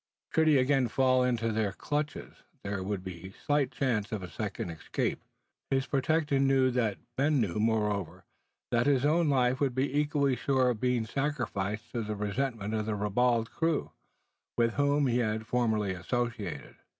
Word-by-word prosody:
Should 160 0 +3
he 150 -2 +6
again 130 0 +3
fall 130 +1 +3
into 115 -3 0
their 105 -2 0
clutches, 150 +6 -3 0.3
there 100 -1 -3
would 95 -1 -3
be 95 0 -7
but 95 - -18
slight 145 -2 +1
chance 115 -6 -1
of 105 -4 -3
a 90 - -8
second 100 -2 -4
escape. 80 - -3 0.5
His 135 0 +1
protector 145 +1 +1
knew 135 -1 +3
that. 115 -6 0 0.2
Ben 145 +1 +3
knew, 105 -4 0
moreover, 105 -4 0 0.5
that 120 +1 +2
his 140 -1 +3
own 160 +1 +3
life 130 -2 +2
would 135 -4 0
be 135 +1 0
equally 145 -2 +2
sure 130 0 +2
of 110 - -5
being 125 -3 +1
sacrificed 115 -5 -2
to 120 - -2
the 105 -1 -3
resentment 105 +1 -2
of 110 -1 -1
the 110 - -1
ribald 115 +3 +1
crew, 165 -2 -1 0.7
with 115 -1 +2
whom 145 0 +2
he 125 -1 +2
had 110 -1 -1
formerly 110 -5 +1
associated. 115 +3 -3
120 Hz, 170 wpm, -30 LUFS, 105-135 Hz, 0.7 s, he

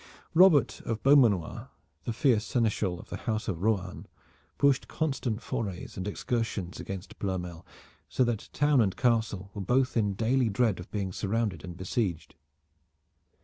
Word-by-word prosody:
Robert 160 -7 +5
of 115 -1 -3
Beaumanoir, 120 - +3 0.4
the - - -1
fierce 120 -3 +2
seneschal 105 -7 0
of - - -13
the - - -3
house 110 0 -1
of 90 -5 -3
Rohan, 100 -4 -1 0.5
pushed 140 -2 +3
constant 130 -7 -2
forays 95 -6 -4
and 95 +1 -4
excursions 105 -4 -3
against 95 +1 -7
Ploermel 90 -4 -4 0.5
so 130 - +2
that 120 -3 -2
town 145 -3 +3
and 95 -4 0
castle 110 -6 0
were 100 - -5
both 125 +6 +1
in 105 -4 +1
daily 120 +3 +2
dread 110 -2 +1
of 90 - -9
being 100 -3 -3
surrounded 105 -5 -1
and 85 -1 -8
besieged. 90 -3 -2
110 Hz, 145 wpm, -29 LUFS, 95-120 Hz, 0.5 s, Robert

